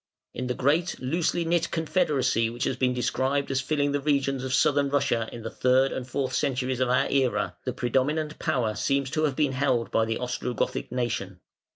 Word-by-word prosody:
In 125 - -4
the 125 - -1
great, 155 +6 +1
loosely 165 +5 0
knit 170 0 +1
confederacy 150 -8 +1
which 120 +1 -4
has - - 0
been 125 -1 +1
described 135 +3 0
as 135 0 +1
filling 145 +1 0
the 145 - 0
regions 135 -2 0
of 130 - -3
Southern 140 +2 +3
Russia 120 -5 +1
in 115 - -8
the 115 - -5
third 130 +1 +3
and 125 - -4
fourth 130 0 -2
centuries 130 -2 0
of 130 -1 +1
our 125 - +3
Era, 105 -9 0
the 130 - -2
predominant 140 +5 -1
power 115 -5 0
seems 140 +2 0
to 155 0 +1
have 140 -4 -1
been 145 -2 +1
held 130 -3 0
by 115 - +2
the 115 0 -2
Ostrogothic 125 -1 -3
nation. 110 -7 -3
130 Hz, 195 wpm, -26 LUFS, 125-145 Hz, -, Southern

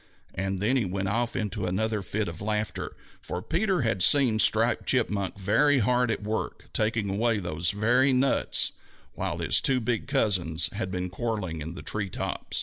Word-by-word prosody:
And 95 +1 -2
then 110 +8 +1
he 125 - +1
went 95 +1 -2
off 120 +3 -1
into 105 -4 -2
another 105 +3 -1
fit 105 +2 -3
of 85 +1 -7
laughter, 105 0 -3 0.3
for 90 - -5
Peter 185 -2 0
had 110 -5 0
seen 125 0 +6
Striped 115 +2 +3
Chipmunk 105 -7 0
very 115 +10 +3
hard 125 +1 +2
at 110 - -2
work 110 +1 -4
taking 110 -1 0
away 110 +3 +1
those 85 -3 -1
very 120 +7 +2
nuts 130 +1 +2 0.4
while - - -3
his - - +2
two 130 -1 +2
big 115 -1 -2
cousins 95 - +1
had 100 -1 -3
been 90 -1 -4
quarreling 100 -7 -3
in 80 +3 -6
the - - -8
tree 105 -2 -3
top. - - -5
110 Hz, 175 wpm, -27 LUFS, 95-120 Hz, 0.4 s, seen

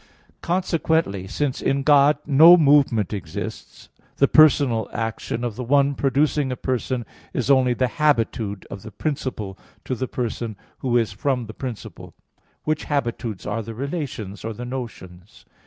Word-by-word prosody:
Consequently, 160 - 0
since 140 +6 -2
in 135 0 0
God 145 0 +5
no 160 +5 +8
movement 140 - +3
exists, 85 -6 -7 0.3
the 140 - +4
personal 140 -8 +4
action 115 +1 -3
of 120 -4 -3
the 125 - -5
one 140 +3 +3
producing 140 0 +1
a - - -2
person 125 -1 -2 0.3
is 130 +2 +1
only 130 -2 +4
the 130 - +1
habitude 115 -8 +1
of 100 - -7
the 110 - -9
principle 110 -5 -4 0.3
to - - -2
the 130 +1 -3
person 115 -3 -4 0.2
who 120 -2 +1
is 115 -4 +1
from 125 +4 -1
the 110 - -9
principle; 125 -3 -8 0.5
which 155 0 -1
habitudes 120 -7 -3
are 110 +2 -2
the 115 +1 -8
relations, 135 - -5
or 115 0 -4
the 120 +3 -7
notions. 110 -8 -8
125 Hz, 150 wpm, -23 LUFS, 110-140 Hz, 0.5 s, no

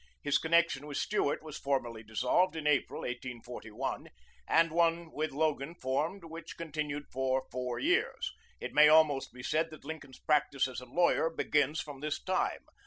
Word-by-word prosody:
His 145 -1 +3
connection 160 -3 +2
with 145 - -4
Stuart 155 -8 0
was 155 -1 -7
formally 120 -5 -1
dissolved 125 +11 +1
in 155 -2 -5
April, 150 -1 +1
1841, 120 -1 -5 0.4
and 165 0 +4
one 165 0 +2
with 155 +1 -1
Logan 150 +1 -1
formed 155 +8 -1
which 165 0 -9
continued 150 -3 -3
for 130 0 0
four 125 -1 -3
years. - - +1 0.3
It - - -6
may 150 0 +8
almost 155 -3 +4
be 125 0 -11
said 155 +6 +1
that 155 -3 -12
Lincoln's 145 -4 -8
practice 140 -3 +2
as 130 -1 -6
a 125 - -11
lawyer 170 +3 +3
begins 150 -2 +1
from 145 -2 -8
this 150 +1 -2
time. 185 0 -1
150 Hz, 165 wpm, -32 LUFS, 130-160 Hz, 0.4 s, may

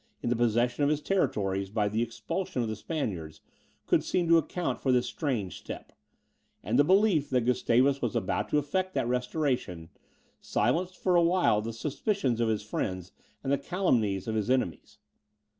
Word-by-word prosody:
in 120 - 0
the - - +3
possession 120 +3 +1
of 145 - +3
his 150 -1 +1
territories, 100 - 0
by 105 0 0
the 110 +2 -1
expulsion 120 +4 -3
of - - -2
the 110 - -3
Spaniards, 95 - -4 0.5
could - - +2
seem 175 -2 0
to 165 0 +6
account 175 +3 -3
for 130 - +2
this 125 -1 +3
strange 120 - -3
step; - - -8 0.7
and 110 +8 +1
the - - +7
belief 185 -3 +3
that 125 -3 +1
Gustavus 125 +2 +2
was 120 -4 -1
about 95 - -1
to - - +2
effect 185 +6 -1
that - - 0
restoration, 125 - -1 0.5
silenced 170 - 0
for 180 -2 +1
a 175 - +6
while 170 - +3
the 115 +2 -4
suspicions 135 - -1
of 115 - +2
his 110 -2 -1
friends 95 -3 -4 0.3
and 135 0 0
the 140 - +1
calumnies 120 - 0
of 110 - -1
his 110 +1 -1
enemies. 125 - -1
125 Hz, 175 wpm, -29 LUFS, 110-155 Hz, 0.7 s, the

